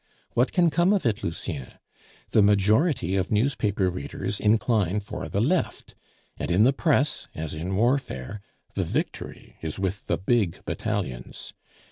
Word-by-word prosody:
"What 125 +3 +2
can 175 -3 +3
come 175 +5 +3
of 195 -8 0
it 115 -1 0
Lucien? 80 -5 -4 0.6
The 110 - +5
majority 105 - +3
of 95 0 0
newspaper 105 -4 +1
readers 95 +2 -4
incline 105 -3 +2
for 100 - -6
the 100 - -1
Left; 160 - 0 0.4
and - - -3
in 90 +5 +4
the 130 +4 +5
press, 150 -1 +1
as 80 -1 -4
in 85 +5 -3
warfare, 105 - 0 0.3
the - - 0
victory - - -4
is 80 -2 -4
with 95 +1 -2
the - - +1
big 100 -2 0
battalions. 60 -1 -4
105 Hz, 145 wpm, -26 LUFS, 95-125 Hz, 0.6 s, The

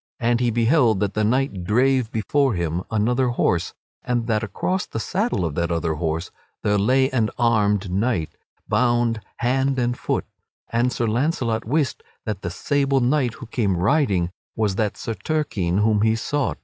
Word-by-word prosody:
And 120 -1 +2
he 125 -1 +2
beheld 115 -1 +3
that 105 -1 0
this 110 - 0
knight 115 -4 0
drave 125 +4 +2
before 130 +2 +1
him 85 0 -1
another 120 +4 +1
horse, 90 -8 0 0.3
and 120 -2 -1
that 110 -2 +1
across 180 - -2
the - - -4
saddle 190 - -1
of 80 - -2
that 85 +2 -1
other 85 -1 0
horse 80 +2 -3 0.3
there 105 -1 +2
lay 130 +6 +3
an 115 -4 +1
armed 105 -5 +2
knight, 95 -4 -1 0.3
bound 120 -2 +1 0.2
hand 130 +2 +1
and 120 -1 0
foot; - - -2 0.5
and 120 +2 +2
Sir 120 - -1
Launcelot 115 -1 0
wist 140 +4 0 0.2
that 105 -4 -3
the - - -3
sable 140 -1 +1
knight 125 -2 +1
who - - -9
came 105 -5 0
riding 95 - +2 0.2
was 105 -3 +1
that 105 +1 -1
Sir 115 - -4
Turquine 110 - -1
whom 105 0 +3
he 110 +1 +3
sought. 145 +5 -1
115 Hz, 170 wpm, -22 LUFS, 105-130 Hz, 0.5 s, beheld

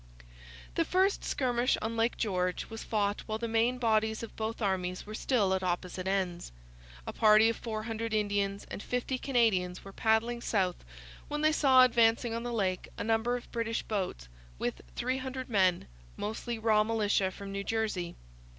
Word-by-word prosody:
The - - +2
first 380 +2 +2
skirmish 250 -1 +1
on 225 +1 -3
Lake 230 +1 +1
George 185 -2 -1
was 225 - -6
fought 205 -2 0
while 215 -1 -2
the 230 +1 -3
main 230 +2 +2
bodies 220 -2 +1
of 230 - -8
both 220 +1 -3
armies 185 -4 -1
were 215 - -8
still 215 -4 +1
at 190 - 0
opposite 180 0 -2
ends. 185 - -1 0.5
A - - -5
party 215 0 +6
of 230 - -2
400 225 0 -4
Indians 205 -2 0
and - - -5
50 250 +2 -2
Canadians 210 -10 +1
were 195 - -10
paddling 230 +3 +1
south 190 -6 0 0.4
when 295 0 -3
they 310 0 +4
saw 265 -4 +6
advancing 230 -1 +3
on 230 - -2
the 240 0 -4
lake 190 -5 -1
a - - -3
number 225 +2 +1
of 245 - -12
British 230 -1 -2
boats 185 - -3 0.3
with - - -3
300 260 0 -3
men, 185 -4 +3 0.3
mostly 220 +3 -3
raw 220 -1 +3
militia 210 -3 +1
from 195 +1 -8
New 200 0 -3
Jersey. 205 -6 -2
220 Hz, 170 wpm, -30 LUFS, 195-235 Hz, 0.5 s, party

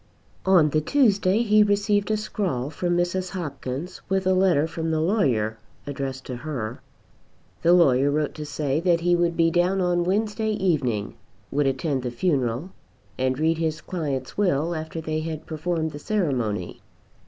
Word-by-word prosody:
On 175 -5 +5
the 155 - +2
Tuesday 205 - +3
he 215 -1 +5
received 205 0 +2
a 215 - +2
scrawl 175 -11 -2
from 175 +2 -1
Mrs. 180 +1 -1
Hopkins 150 -1 -5
with 190 0 +1
a 185 - +3
letter 185 -5 +3
from 160 0 -3
the 160 -1 +1
lawyer 130 - +1 0.3
addressed 135 -2 -5
to 125 - -5
her. 125 -5 -5 0.8
The 170 - +5
lawyer 140 -6 +5
wrote 150 0 0
to 150 - -6
say 145 0 -1
that 170 -1 +2
he 175 +1 +3
would 170 -1 +1
be 165 -1 +3
down 180 +3 +2
on 175 -1 +1
Wednesday 215 +3 0
evening, 140 - -1 0.3
would 145 0 +1
attend 135 +1 -1
the 125 - -3
funeral, 130 +2 -1 0.5
and 130 0 +1
read 160 +2 +1
his 160 -2 -1
client's 145 -7 -4
will 170 -4 +1
after 160 0 -5
they 155 0 -2
had 155 -1 -5
performed 160 0 -2
the 145 - -8
ceremony. 130 - -2
160 Hz, 165 wpm, -24 LUFS, 140-185 Hz, 0.8 s, On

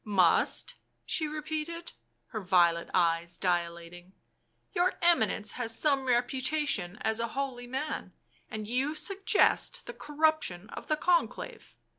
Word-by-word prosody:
"Must?" 190 -5 +3 0.3
she 315 - 0
repeated, 310 +2 -5 0.4
her 220 -3 -4
violet 175 -3 +3
eyes 170 -1 +1
dilating. 175 0 -2 0.3
" - - -45
Your 355 +1 +2
Eminence 220 - +2
has 230 -2 -2
some 280 -3 +2
reputation 255 - 0
as 220 0 +1
a 230 - 0
holy 255 -3 -3
man 265 +5 -4 0.2
— - - -36
and 215 -1 -5
you 265 +6 0
suggest 390 +6 +2
the - - -7
corruption 295 - 0
of - - -8
the 310 - +1
Conclave 345 +1 -1
245 Hz, 130 wpm, -30 LUFS, 185-305 Hz, 0.4 s, Must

